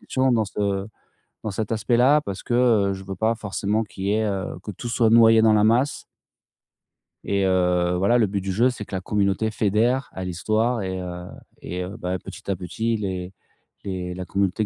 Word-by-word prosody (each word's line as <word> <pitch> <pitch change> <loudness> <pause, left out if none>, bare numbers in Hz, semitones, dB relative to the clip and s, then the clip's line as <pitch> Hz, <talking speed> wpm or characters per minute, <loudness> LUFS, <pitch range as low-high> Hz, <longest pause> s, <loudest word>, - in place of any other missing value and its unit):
questions 130 -1 +1
dans 110 -2 +2
ce 100 -1 -2 0.6
dans 110 - -3
cet 110 +3 -3
aspect-là, 120 +7 +3
parce 100 -8 -6
que, 120 - -3
heu, 110 -6 +3
je 95 0 -8
veux 95 0 -6
pas 110 +4 +1
forcément 105 +1 -1
qu'il 95 -2 -8
y 100 - +1
ait, 110 0 +1
heu 100 -3 -3
que 105 - -5
tout 120 +6 -7
soit 115 -2 +3
noyé 115 -1 +6
dans 110 -1 +5
la 105 0 +4
masse. 120 +6 +2 1.2
Et 100 -1 +1
heu 90 -1 +2
voilà, 100 +6 +3
le 110 -4 +3
but 100 0 -2
du 95 0 -3
jeu, 120 +7 +3
c'est 120 -4 -6
que - - -14
la - - -1
communauté 100 +2 0
fédère 115 +5 +1
à 95 - -5
l'histoire, 110 +6 0
et 95 -1 -3
heu 90 -1 -6 0.4
et 90 +1 -5
heu, 95 +4 -7
bah, 90 -2 -3
petit 105 0 -10
à - - 0
petit, 110 +6 -2
les 95 -3 -4 0.5
les 90 -2 -4
la 90 0 -6
communauté 100 +2 0
100 Hz, 205 wpm, -23 LUFS, 95-115 Hz, 1.2 s, noyé